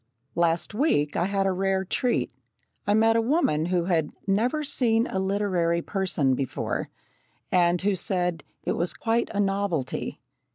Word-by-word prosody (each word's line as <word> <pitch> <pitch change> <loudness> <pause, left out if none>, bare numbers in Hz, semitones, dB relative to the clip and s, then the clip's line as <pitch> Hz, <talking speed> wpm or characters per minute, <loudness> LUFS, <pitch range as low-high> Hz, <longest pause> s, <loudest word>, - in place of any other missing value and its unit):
Last 170 +3 0
week 210 - +1
I 175 - +1
had 195 0 0
a 195 - +2
rare 190 0 0
treat. 200 - 0 0.6
I 205 - +4
met 225 +1 +4
a 230 - +4
woman 225 - +1
who 175 -1 0
had 165 -4 +1 0.2
"never 235 +10 +1
seen 235 -5 +2
a 190 - -3
literary 190 -4 0
person 180 -9 0
before," 130 -1 -3 0.6
and 175 -1 +3
who 205 0 +2
said 180 -3 0 0.2
"it - - -1
was 175 +1 0
quite 230 +1 0
a 205 - -3
novelty!" 195 -8 -1
190 Hz, 155 wpm, -26 LUFS, 170-215 Hz, 0.6 s, I